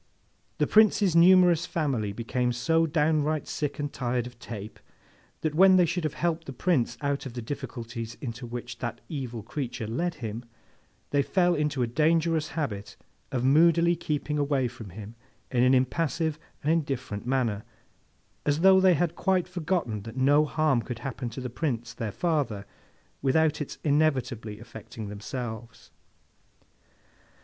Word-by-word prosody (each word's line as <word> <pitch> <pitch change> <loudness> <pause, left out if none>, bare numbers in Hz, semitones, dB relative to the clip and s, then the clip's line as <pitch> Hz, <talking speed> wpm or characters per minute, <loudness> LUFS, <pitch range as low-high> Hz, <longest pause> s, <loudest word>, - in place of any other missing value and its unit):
The - - +2
Prince's 210 -4 +4
numerous 180 0 +6
family 130 -11 -1
became 120 +3 -1
so 160 +7 +2
downright 155 -1 +1
sick 145 -1 -3
and 145 -1 -3
tired 125 -1 -1
of 125 -1 -11
Tape, 110 -3 -8 0.6
that 155 -2 -1
when 190 +4 +7
they 180 -1 +6
should 175 0 -2
have 155 - -2
helped 165 0 -1
the 135 - -5
Prince 125 -5 0
out 140 -1 -1
of 125 - -9
the 120 - -5
difficulties 115 -3 -6
into 120 -1 -6
which 120 0 -7
that 120 -2 -4
evil 125 -7 -5
creature 125 -4 -4
led 165 +11 -2
him, 115 -3 -5 0.7
they 145 - +3
fell 175 +4 +2
into 150 -4 0
a - - +2
dangerous 160 +4 +2
habit 105 -10 -3 0.3
of 125 -2 -1
moodily 170 +4 +5
keeping 150 -2 -2
away 140 -3 +1
from 115 -3 -10
him 105 +4 -9 0.4
in 125 -2 +2
an 130 +1 +5
impassive 155 +4 0 0.2
and 150 - +2
indifferent 135 -9 -2
manner, 120 -6 0 0.8
as 145 +2 +1
though 190 +1 +7
they 185 -2 +5
had 170 +1 0
quite 190 -2 +1
forgotten 165 - -2
that 115 +4 -9
no 145 +3 +4
harm 150 -5 +1
could 120 0 -6
happen 130 -2 -4
to 120 +3 -7
the 125 - -3
Prince 120 -3 -3
their 110 -3 -4
father, 145 - -1 0.6
without 150 +3 +2
its 145 - -5
inevitably 135 -8 0
affecting 110 -1 -9
themselves. 115 +2 -7
140 Hz, 155 wpm, -27 LUFS, 120-160 Hz, 0.8 s, when